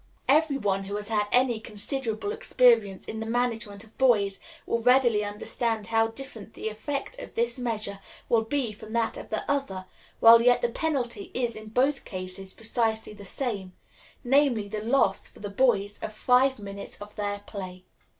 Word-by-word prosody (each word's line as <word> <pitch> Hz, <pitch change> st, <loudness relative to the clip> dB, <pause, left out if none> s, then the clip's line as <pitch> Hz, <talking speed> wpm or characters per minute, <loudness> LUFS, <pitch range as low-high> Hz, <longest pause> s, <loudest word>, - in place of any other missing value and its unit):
Every 295 Hz, 0 st, +4 dB
one 195 Hz, -5 st, 0 dB
who 200 Hz, +1 st, -4 dB
has 205 Hz, +1 st, -4 dB
had 210 Hz, -2 st, +1 dB
any 245 Hz, -2 st, +3 dB
considerable 225 Hz, -, -3 dB
experience 240 Hz, -, +3 dB
in 220 Hz, -, -5 dB
the 225 Hz, -, -4 dB
management 225 Hz, -3 st, -1 dB
of 225 Hz, -1 st, -19 dB
boys 210 Hz, -7 st, +3 dB, 0.3 s
will 230 Hz, -, 0 dB
readily 240 Hz, -3 st, +4 dB
understand 215 Hz, +1 st, -2 dB
how 225 Hz, 0 st, +2 dB
different 225 Hz, -2 st, -9 dB
the 220 Hz, -, -3 dB
effect 275 Hz, -, -5 dB
of -, -, -9 dB
this 465 Hz, -, 0 dB
measure 215 Hz, -5 st, -2 dB, 0.3 s
will 230 Hz, -2 st, +4 dB
be 245 Hz, +1 st, -1 dB
from 215 Hz, +1 st, -11 dB
that 230 Hz, -1 st, +1 dB
of -, -, -9 dB
the 215 Hz, -, -2 dB
other, 270 Hz, -10 st, -1 dB, 0.3 s
while 230 Hz, 0 st, +9 dB
yet 245 Hz, +1 st, +4 dB
the 240 Hz, -, +3 dB
penalty 245 Hz, -7 st, -2 dB
is 240 Hz, -2 st, -1 dB
in 215 Hz, 0 st, -9 dB
both 270 Hz, +5 st, +1 dB
cases 185 Hz, 0 st, -7 dB
precisely 225 Hz, -1 st, -1 dB
the 205 Hz, -1 st, -11 dB
same 200 Hz, -4 st, -3 dB, 0.5 s
namely, 255 Hz, -5 st, +3 dB
the 210 Hz, +1 st, -4 dB
loss, 225 Hz, -4 st, +2 dB
for -, -, -17 dB
the 205 Hz, -1 st, -6 dB
boys, 205 Hz, -3 st, +2 dB
of -, -, -4 dB
five 250 Hz, +4 st, +3 dB
minutes 200 Hz, -1 st, -8 dB
of 205 Hz, 0 st, -11 dB
their 205 Hz, -1 st, -3 dB
play. 185 Hz, -3 st, -8 dB
225 Hz, 175 wpm, -27 LUFS, 205-250 Hz, 0.5 s, while